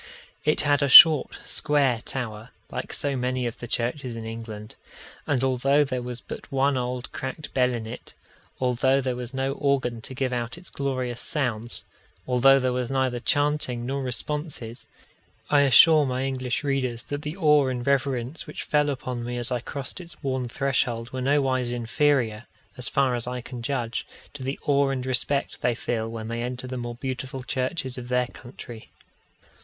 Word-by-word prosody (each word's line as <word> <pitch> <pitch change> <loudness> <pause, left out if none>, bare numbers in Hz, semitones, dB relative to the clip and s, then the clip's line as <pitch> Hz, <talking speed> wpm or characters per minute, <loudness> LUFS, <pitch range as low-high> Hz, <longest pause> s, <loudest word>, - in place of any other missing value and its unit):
It 150 0 +3
had 145 -1 +2
a 140 - +2
short 155 +1 +10
square 135 -6 +1
tower, 115 -3 -5 0.2
like - - -5
so 140 -1 0
many 125 0 -1
of 120 - -4
the 120 - -6
churches 120 +1 -2
in 115 -1 -6
England; 110 -2 -7 0.5
and 135 -3 +1
although 135 +3 +3
there 130 -3 -3
was 120 0 -5
but - - -9
one 135 +1 +2
old 125 0 -3
cracked 135 +3 -6
bell 125 -1 +3
in 115 -2 -4
it, 115 +3 -9 0.4
although 130 +1 +2
there 130 -2 -1
was 125 -1 -4
no 135 +1 0
organ 135 -4 0
to 130 - -7
give 130 -1 -1
out 120 +3 -2
its 175 0 -11
glorious 130 -3 -3
sounds, 120 -6 -2 0.4
although 135 +2 +5
there 130 -1 0
was 125 -1 -2
neither 130 -2 0
chanting 145 -3 0
nor 135 +2 -2
responses, 130 -2 -4 0.6
I 145 -1 +6
assure 145 +3 +7
my 130 0 -1
English 130 0 -2
readers 130 -4 -1
that 145 0 -5
the 150 +4 -5
awe 150 -5 +4
and 125 -2 -3
reverence 135 0 0
which - - -6
fell 150 -1 +2
upon 125 -3 -4
me 120 +1 -4
as 120 +1 -1
I 125 - 0
crossed 135 +7 -6
its 170 -3 -13
worn 130 -2 -1
threshold 120 -3 -1
were 130 - -4
nowise 130 -2 +1
inferior, 120 -2 +1 0.3
as 125 -2 -3
far 135 -2 +2
as 120 -1 -2
I 125 0 -3
can 120 0 -8
judge, 120 -2 -2 0.3
to 145 - -9
the 135 +2 -3
awe 140 -1 +3
and 130 -2 -2
respect 130 +2 0
they 120 -1 +1
feel 115 -1 -2
when 115 -1 -6
they 115 +1 -3
enter 125 +1 -4
the 130 0 -5
more 120 -1 -5
beautiful 130 +1 -5
churches 130 0 -2
of 120 - -8
their 125 0 +2
country. 120 -2 -11
130 Hz, 180 wpm, -25 LUFS, 120-140 Hz, 0.6 s, short